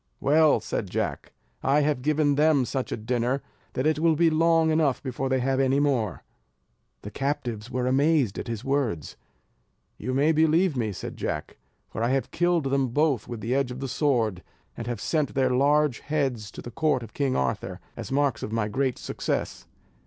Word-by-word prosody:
"Well," 155 +1 +4
said - - -4
Jack, - - -3 0.3
"I 140 +3 +3
have 145 -3 0
given 150 +1 +2
them 150 -2 +3
such 130 +1 -3
a - - -2
dinner 120 +4 -1 0.3
that 130 - -1
it 155 -1 +2
will 165 0 +3
be 165 +1 +3
long 165 0 +3
enough 155 -5 +1
before 130 0 -3
they 130 0 +2
have 135 +1 +1
any 135 +1 +3
more." 125 - 0 0.8
The 105 - -7
captives 120 -5 -3
were 125 0 -2
amazed 135 -3 +2
at - - -6
his 115 +1 -5
words. 130 - -1 0.8
"You 130 +4 -3
may 145 +4 +4
believe 160 +2 +3
me," 115 -4 -1
said 95 - -7
Jack; - - -4 0.3
"for 110 - -6
I 115 - +1
have 135 0 0
killed 175 -2 +2
them 135 -1 +2
both 140 -2 +1
with 120 -3 -6
the 115 +4 -1
edge 135 -1 +1
of 125 +1 -6
the 135 - -3
sword, 120 - 0 0.3
and 115 - -6
have 120 -3 -3
sent 150 -6 -1
their 130 -1 +2
large 145 +1 +3
heads 135 -8 -2
to - - -9
the 120 - -8
court 150 -5 +1
of 110 - -11
King 135 -3 0
Arthur, 65 - -2 0.2
as - - -7
marks 140 -2 +1
of - - -5
my 115 -2 0
great 130 +3 -1
success." - - -3
135 Hz, 190 wpm, -26 LUFS, 120-150 Hz, 0.8 s, Well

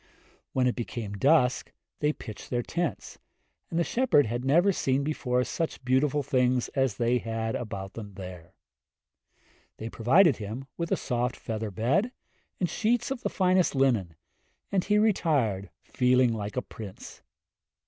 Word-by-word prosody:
When 130 -1 +2
it 125 - +2
became 115 -3 -5
dusk 130 +4 +3 0.3
they 150 0 +2
pitched 110 -8 -9
their 120 -1 -1
tents, 165 - -3 0.5
and 165 - -3
the 170 - +3
shepherd 235 - +3
had 120 +3 -3
never 170 +9 +4
seen 135 -6 0
before 125 -4 0
such 155 +1 -4
beautiful 135 +3 +2
things 125 -1 +1
as 135 -5 0
they 120 +1 +2
had 115 -1 -3
about 95 -4 -5
them 105 -4 -8
there. 90 -2 -9 1.2
They 110 - -5
provided 145 - +4
him 110 +5 -6
with 170 -1 -4
a - - +3
soft 125 -1 -1
feather 110 -1 -4
bed 135 - +1 0.5
and 180 - +1
sheets 230 - 0
of 265 -3 -3
the - - -1
finest 185 -4 +2
linen, 115 -11 +2 0.6
and 190 -2 +2
he 210 +1 +2
retired, 145 - +1
feeling 125 -1 +3
like 105 +1 -5
a 125 - 0
prince. 105 -5 -10
125 Hz, 150 wpm, -28 LUFS, 110-160 Hz, 1.2 s, never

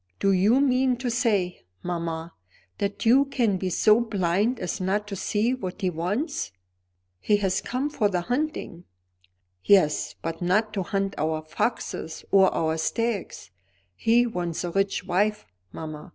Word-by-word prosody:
Do 195 - +3
you 200 +7 +4
mean 260 -2 +2
to 245 0 -2
say, 205 -7 0 0.2
mamma, 170 -1 -4 0.5
that 200 +2 -2
you 260 +5 +6
can 235 -8 +1
be 185 0 -2
so 215 +5 +4
blind 205 +2 0
as 180 +1 -3
not 205 +3 0
to 200 - -4
see 215 +5 0
what 195 -5 -5
he 185 -2 +1
wants?" 205 - -2 0.7
"He 205 - +2
has 190 -2 0
come 255 +4 -2
for 220 -8 +1
the 180 -3 0
hunting." 245 - -3 0.8
"Yes, 185 -7 +3
but 165 +1 -4
not 210 +5 +1
to 200 - -1
hunt 195 +1 -1
our 155 +1 -1
foxes 160 0 -3
or 190 -1 +6
our 160 0 0
stags. 225 - -2 0.4
He 235 - +3
wants 175 -7 -3
a 175 - -3
rich 195 +1 0
wife, 210 +3 0 0.3
mamma. 155 +3 -7
195 Hz, 150 wpm, -25 LUFS, 175-230 Hz, 0.8 s, you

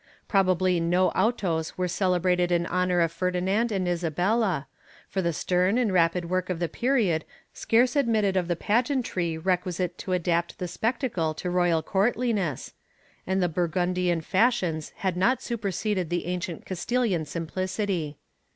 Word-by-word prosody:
Probably 185 -3 +2
no 175 +2 +2
autos 175 -9 0
were 180 0 0
celebrated 180 -1 +1
in 170 0 +2
honor 180 0 +1
of 165 -1 +2
Ferdinand 185 +6 0
and 190 -3 -1
Isabella, 175 +1 0 0.4
for 190 - -2
the 170 -1 0
stern 180 +6 +1
and 230 -6 +1
rapid 170 0 +2
work 185 +1 -1
of 180 - -1
the 170 0 -1
period 215 - +1 0.3
scarce 245 +3 +2
admitted 220 -8 +2
of 180 -2 +1
the 175 - 0
pageantry 215 - 0
requisite 180 0 -1
to 185 - -3
adapt 170 -1 0
the 180 - -3
spectacle 185 - -1
to 180 +3 -4
royal 175 -3 +2
courth 200 +8 +1
ness, 205 - -1 0.5
and 190 0 +1
the - - +3
Burgundian 175 +1 0
fashions 185 -5 +1
had 190 -3 -1
not 240 +8 +2
superseded 210 -6 -2
the 175 0 -1
ancient 175 -1 -4
Castilian 195 -1 0
simplicity. 170 0 -3
180 Hz, 145 wpm, -26 LUFS, 170-200 Hz, 0.5 s, the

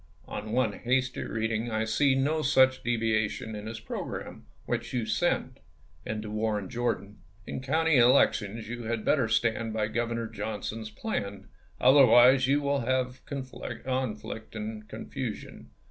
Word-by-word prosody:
On 105 +1 -6
one 120 -3 +1
hasty 125 +5 0
reading 110 +1 -2
I 110 0 0
see 135 +4 +3
no 150 +4 +1
such 130 -2 +4
deviation 110 -2 0
in 105 +1 -7
his 110 0 -6
programme, - - -6 0.2
which - - -3
you 120 -3 0
send." 110 - 0 0.5
And 110 0 -3
also - - -5
to - - -7
Warren 105 -3 -1
Jordan: 110 -4 -2
" 100 +1 -29
In - - -4
county 160 +3 +2
elections 115 -3 +3
you 120 0 -6
had 115 -1 -2
better 130 -6 +3
stand 115 0 0
by 110 -1 0
Governor 115 0 -1
Johnson's 110 +1 -5
plan; 100 - -4 0.3
otherwise 130 -1 +7
you 145 +2 +2
wUl 140 0 +1
have 130 +1 -1
conflict 135 -2 -6 0.7
and 105 0 -6
confusion. - - -6
115 Hz, 145 wpm, -28 LUFS, 110-130 Hz, 0.7 s, otherwise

